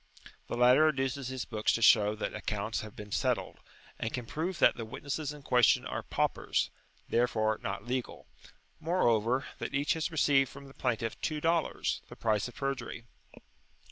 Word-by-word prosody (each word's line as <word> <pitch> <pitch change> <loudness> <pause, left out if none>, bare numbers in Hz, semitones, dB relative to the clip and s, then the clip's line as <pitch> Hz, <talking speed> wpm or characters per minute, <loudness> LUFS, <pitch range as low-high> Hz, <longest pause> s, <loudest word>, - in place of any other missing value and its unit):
The - - -3
latter 125 +5 +6
adduces 135 -2 -1
his 130 -1 -4
books 110 -2 0
to 115 - -1
show 105 -1 +6
that 110 - -4
accounts 105 +1 -2
have 110 -1 -10
been 105 -1 -9
settled, - - -1 0.4
and 115 - -2
can 125 -2 -4
prove 170 +9 -3
that - - +5
the 115 - -5
witnesses 140 +6 -4
in 150 -1 -11
question 125 -3 +4
are - - -3
paupers, - - 0 0.4
therefore, 110 -2 +1
not 100 +2 -4
legal; 125 0 -3 0.5
moreover, 130 - +2
that - - -4
each 140 +1 +2
has 160 +1 -2
received 140 -5 +3
from 140 - -11
the 135 - -13
plaintiff 115 -4 -2
two 155 -2 -1
dollars, 165 +1 0
the - - -10
price 110 -1 0
of 125 - -12
perjury. 130 -4 -4
125 Hz, 170 wpm, -31 LUFS, 110-140 Hz, 0.5 s, latter